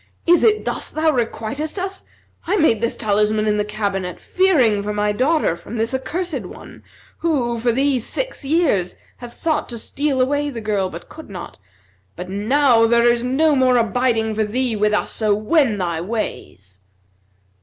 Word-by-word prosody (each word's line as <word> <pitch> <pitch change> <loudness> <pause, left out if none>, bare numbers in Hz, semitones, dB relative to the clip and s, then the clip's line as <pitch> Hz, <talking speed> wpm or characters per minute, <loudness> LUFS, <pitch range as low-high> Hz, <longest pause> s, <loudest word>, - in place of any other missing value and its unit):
Is 345 0 +4
it 430 -1 +3
thus - - -1
thou 315 0 +1
requiitest 255 - -3
us? 385 +1 -5 0.4
I 395 +4 +1
made 235 - +3
this 235 - -1
talisman 215 0 +1
in 210 -1 +1
the 210 - +1
cabinet 200 -4 -3
fearing 275 - +2
for 210 +1 -3
my 210 0 0
daughter 260 - +1
from 220 +7 -8
this 225 +3 0
accursed 340 +6 -3
one - - -12 0.4
who, 250 -8 0
for 235 +1 +1
these 265 0 +1
six - - -4
years, 275 - +1 0.2
hath 240 -1 -9
sought 315 -2 -1
to 235 - -5
steal 275 +4 -2
away 285 +3 +1
the 240 -5 -6
girl, 205 -4 -1
but 170 -1 -10
could 315 -5 -12
not. 180 - -9 0.6
But 180 +1 -7
now 230 +3 +3
there 235 0 +3
is 240 0 +3
no 290 +5 +2
more 255 -2 +3
abiding 230 -1 +1
for 215 +1 0
thee 235 +2 -1
with 210 0 +1
us, 210 - 0
so 215 -2 +1
wend 220 0 +1
thy 170 -3 -2
ways.' 100 - -5
235 Hz, 175 wpm, -20 LUFS, 210-290 Hz, 0.6 s, Is